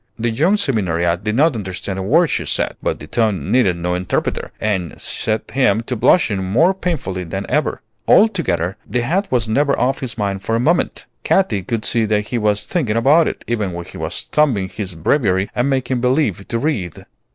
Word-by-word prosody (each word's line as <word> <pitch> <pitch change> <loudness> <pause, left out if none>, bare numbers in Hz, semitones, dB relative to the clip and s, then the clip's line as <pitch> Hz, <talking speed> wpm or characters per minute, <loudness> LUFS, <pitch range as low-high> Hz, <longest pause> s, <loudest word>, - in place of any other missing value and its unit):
The 115 0 -1
young 160 - +2
seminariat 90 - 0
did 105 0 -1
not 150 +4 +4
understand 95 -2 -5
a - - -2
word 150 - +4
she - - -1
said; - - 0
but - - -1
the - - -10
tone 110 -4 -1
needed 105 -8 +3
no 90 +1 -2
interpreter, 90 0 -2
and 95 -7 -2
set 110 0 -2
him 115 -4 +2
to 125 +2 -4
blushing 105 - +3
more 130 - +3
painfully 150 - -3
than 95 +3 -5
ever. - - -1 0.2
Altogether, 120 - +3
the 120 - 0
hat 190 +9 -1
was 120 -3 +1
never 140 +5 +1
off 135 +2 +1
his 120 -3 -6
mind 100 -2 -2
for 115 +3 -1
a - - +1
moment. 165 +8 0 0.2
Katy 115 - +2
could 110 +4 -3
see 115 -2 +3
that 105 -1 0
he 120 - -1
was 105 -1 +1
thinking 125 -12 -1
about 150 +8 +4
it, - - -5
even 105 -6 -2
when 85 0 -6
he - - -11
was - - -4
thumbing 120 -11 +2
his 95 -5 -5
Breviary 95 - +1
and 125 +3 0
making 130 -2 0
believe 125 - 0
to 115 - -1
read. 115 - -3
110 Hz, 195 wpm, -19 LUFS, 95-135 Hz, 0.2 s, not